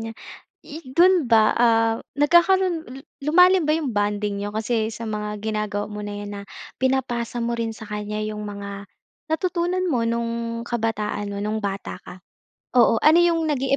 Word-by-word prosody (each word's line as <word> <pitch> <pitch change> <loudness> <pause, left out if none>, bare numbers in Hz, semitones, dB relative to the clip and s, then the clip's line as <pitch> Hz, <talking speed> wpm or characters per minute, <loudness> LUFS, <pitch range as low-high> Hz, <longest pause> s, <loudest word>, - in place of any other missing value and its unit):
niya. 225 0 -5 0.5
I 315 +3 -10
do'n 355 0 +5
ba, 220 -2 +4
ah, 225 -1 +3 0.2
nagkakaroon 345 +4 +4 0.2
lu 265 - -8 0.2
lumalim 360 +4 +5
ba 300 - +1
yung 295 -8 -2
bonding 205 0 0
niyo, 205 +1 -4
kasi 220 +1 -1
sa 230 +1 -6
mga 210 -1 -4
ginagawa 210 -1 -2
mo 210 0 -6
na 205 0 -5
yan 205 - -7
na, 200 - -6 0.4
pinapasa 245 -3 -1
mo 235 0 -1
rin 230 -1 -2
sa 220 -1 -10
kanya 210 0 -4
yung 210 0 -5
mga, 200 -1 -7 0.5
natutunan 360 +2 0
mo 250 -9 +1
no'ng, 230 0 -2
kabataan 215 -3 -2
mo, 200 - -4
no'ng 215 +1 -2
bata 195 0 -4
ka? 180 - -11 0.6
Oo. 240 -2 +5
Ano 315 +2 +7
yung 335 -2 +2
naging 275 -2 +1
230 Hz, 170 wpm, -23 LUFS, 210-290 Hz, 0.6 s, Ano